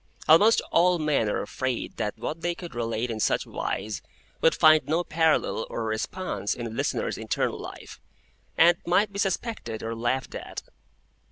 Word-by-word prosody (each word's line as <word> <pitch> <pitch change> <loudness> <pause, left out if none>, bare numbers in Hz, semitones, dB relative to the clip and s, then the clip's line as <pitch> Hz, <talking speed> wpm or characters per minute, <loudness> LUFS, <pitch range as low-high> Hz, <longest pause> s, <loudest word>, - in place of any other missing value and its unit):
Almost 205 +9 +6
all 180 +1 +4
men 150 -9 +1
are - - -1
afraid 130 -2 -3
that 105 +1 -2
what 155 +8 -5
they 175 0 -1
could 170 -5 -9
relate 115 0 -2
in 110 - -4
such - - +1
wise 105 -1 -4 0.4
would 160 - +4
find 155 0 +5
no 165 +3 +1
parallel 160 -8 +1
or 115 - -3
response 110 - -2
in 120 - -5
a 115 - -5
listener's 115 - -2
internal - - -1
life, - - -10 0.6
and 170 +1 +6
might 200 +4 +2
be 200 - -4
suspected 195 - -2
or 115 0 -3
laughed 120 +3 -1
at. - - -7
155 Hz, 165 wpm, -26 LUFS, 115-175 Hz, 0.6 s, Almost